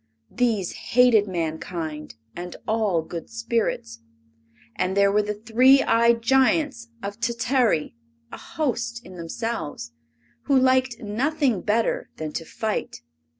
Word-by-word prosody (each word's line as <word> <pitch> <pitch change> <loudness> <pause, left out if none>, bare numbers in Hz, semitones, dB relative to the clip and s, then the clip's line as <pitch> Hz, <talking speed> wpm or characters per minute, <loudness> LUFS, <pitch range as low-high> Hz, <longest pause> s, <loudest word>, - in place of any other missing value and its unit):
These 225 -7 0 0.2
hated 245 -5 +6
mankind 160 -3 -4 0.2
and 175 0 -7
all 215 -7 +1
good 165 +1 -7
spirits. 230 - -2 0.8
And 185 +2 -1
there 200 0 +5
were 210 +1 +3
the 210 0 -3
three 250 +6 +4
eyed 230 0 +3
Giants 265 0 +2 0.2
of 200 +2 -5
Tatary, 235 - +1 0.4
a - - -7
host 235 -5 -3
in 185 - -11
themselves, 170 - -5 0.5
who 275 -2 +3
liked 260 -2 +2
nothing 245 - 0
better 220 +2 0
than 155 -1 -5
to 165 - -5
fight. 215 - -4
225 Hz, 120 wpm, -24 LUFS, 180-245 Hz, 0.8 s, hated